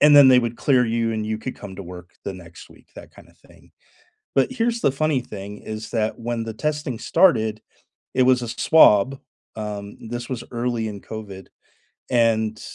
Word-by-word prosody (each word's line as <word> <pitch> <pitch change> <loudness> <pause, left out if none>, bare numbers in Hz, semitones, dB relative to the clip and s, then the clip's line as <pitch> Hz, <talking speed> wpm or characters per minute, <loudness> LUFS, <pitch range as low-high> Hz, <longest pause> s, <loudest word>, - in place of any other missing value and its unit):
and 145 0 +7
then 140 -2 +9
they 130 - +7
would 120 -1 -3
clear 130 -3 +3
you, 115 0 0
and 110 -1 -3
you 110 0 -2
could 130 +3 -6
come 95 -2 -10
to 100 - -7
work 90 0 -10
the 95 - -4
next 85 -2 -13
week, - - -20
that - - -12
kinda - - -17
thing, - - -21 0.6
but 135 - +2
here's 235 -1 0
the 135 - +2
funny 150 -2 +1
thing, 105 -2 -8
is 110 0 -7
that 110 -2 -1
when 115 0 -3
the 110 -1 -6
testing 150 -1 -3
started, 110 - +2 0.5
it 130 - +3
was 125 -1 +4
a 120 - -4
swab, 130 -1 +4 0.4
um, 105 -1 -6
this 120 0 -5
was 120 -2 -4
early 120 -1 -1
in 100 -1 -7
COVID, 100 -3 -9 0.6
and, 110 -3 +2
115 Hz, 190 wpm, -22 LUFS, 105-130 Hz, 0.6 s, then